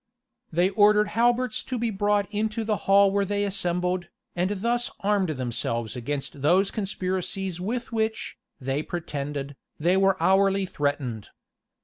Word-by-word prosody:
They 175 +4 +2
ordered 210 0 +4
halberts 240 +2 +1
to 255 -1 -3
be 230 -1 -1
brought 205 0 +1
into 220 +2 -1
the 215 -1 0
hall 200 0 +6
where 200 0 +2
they 205 +1 -1
assembled, 180 -2 -1 0.3
and 180 +2 +1
thus 240 +2 +1
armed 200 -3 +1
themselves 120 -4 -2
against 135 +2 -4
those 185 +7 +3
conspiracies 190 -2 -3
with 235 +6 -3
which, 220 -1 -2 0.2
they 135 +2 -1
pretended, 145 -4 -4 0.2
they 175 +4 +3
were 195 -1 +3
hourly 195 0 +3
threatened. 140 - -2
190 Hz, 135 wpm, -26 LUFS, 155-210 Hz, 0.3 s, hall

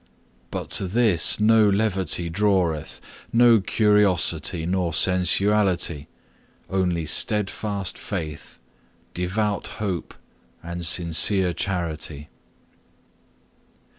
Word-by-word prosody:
But - - -6
to 95 - -1
this 105 -3 +2
no 110 0 +4
levity 95 -5 -1
draweth, 90 -4 -1 0.3
no 115 -1 +5
curiosity, 95 -6 +1
nor 90 -2 -1
sensuality, 90 -3 +2 0.6
only 90 -4 -1
steadfast 100 +2 -1
faith, 80 -7 -7 0.6
devout 100 +3 -2
hope, 95 -7 -4 0.5
and 85 +1 -6
sincere 90 +2 +2
charity. 80 -5 -4
95 Hz, 75 wpm, -23 LUFS, 85-105 Hz, 0.6 s, no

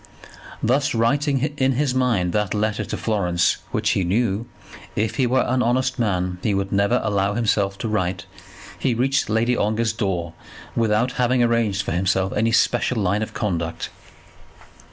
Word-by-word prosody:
Thus, 135 +3 +1
writing 140 +4 +1
in 135 -1 +2
his 135 0 0
mind 115 -9 +1
that 105 -1 0
letter 110 0 0
to - - -5
Florence 90 -6 +1
which - - 0
he 95 - +1
knew, 105 +4 0 0.5
if 110 +3 -1
he 130 -3 +2
were 130 +2 +2
an 125 +1 +1
honest 130 +2 0
man, 90 -5 -1
he 105 -1 0
would 95 0 -2
never 100 0 +2
allow 100 0 0
himself 100 -4 +1
to 115 - -4
write, 95 -4 -1 0.5
he 125 -3 +1
reached 135 0 +1
Lady 115 +3 +2
Ongar's 110 +1 0
door 90 -6 -2 0.4
without 115 +2 +2
having 125 0 +3
arranged 115 -4 +1
for - - -4
himself 95 +2 0
any 115 +2 +1
special 120 +1 +2
line 100 +1 +1
of 110 - -5
conduct. 85 -5 -3
110 Hz, 160 wpm, -22 LUFS, 95-120 Hz, 0.5 s, having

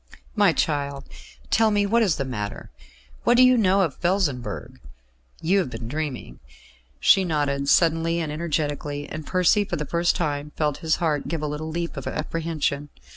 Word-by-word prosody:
"My 205 -4 +5
child, 140 -3 -1 0.5
tell 225 0 +4
me 205 -1 +2
what 230 +4 +2
is 195 -8 +2
the 135 - -3
matter. 105 -6 -5 0.5
What 240 - +4
do 255 - +8
you 255 0 +6
know 195 -4 +3
of 165 -8 -1
Felsenburgh? 130 - -2 0.6
You 190 +5 +3
have 180 - -1
been 115 -2 -7
dreaming." 145 -1 -5 0.6
She 195 - +5
nodded 145 -4 -1
suddenly 165 0 +3
and 160 -3 -3
energetically, 145 -2 -2
and 155 -1 -7
Percy 185 +3 +3
for - - -4
the 150 - -3
first 170 +3 +1
time 150 -2 -2
felt 150 -2 0
his 160 -2 +1
heart 155 -4 -1
give 160 -2 -3
a - - 0
little 150 +2 -4
leap 170 -1 -4
of 135 - -5
apprehension. 155 -2 -2
155 Hz, 175 wpm, -24 LUFS, 145-175 Hz, 0.6 s, do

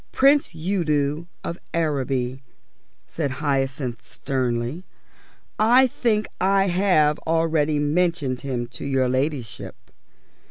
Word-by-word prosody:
"Prince 275 - +3
Udo 155 -3 0 0.2
of 170 - -5 0.2
Araby," 135 -5 -1 0.6
said 150 -4 -3
Hyacinth 135 -4 -1
severely. 130 +3 -3 0.8
"I 240 +5 +6
think 225 -4 0
I 195 +1 +3
have 175 -5 +3
already 160 -2 +2
mentioned 145 -3 0
him 125 -3 -3
to 115 - -9
your 135 -2 +1
ladyship. 130 -3 -2
150 Hz, 95 wpm, -23 LUFS, 130-175 Hz, 0.8 s, I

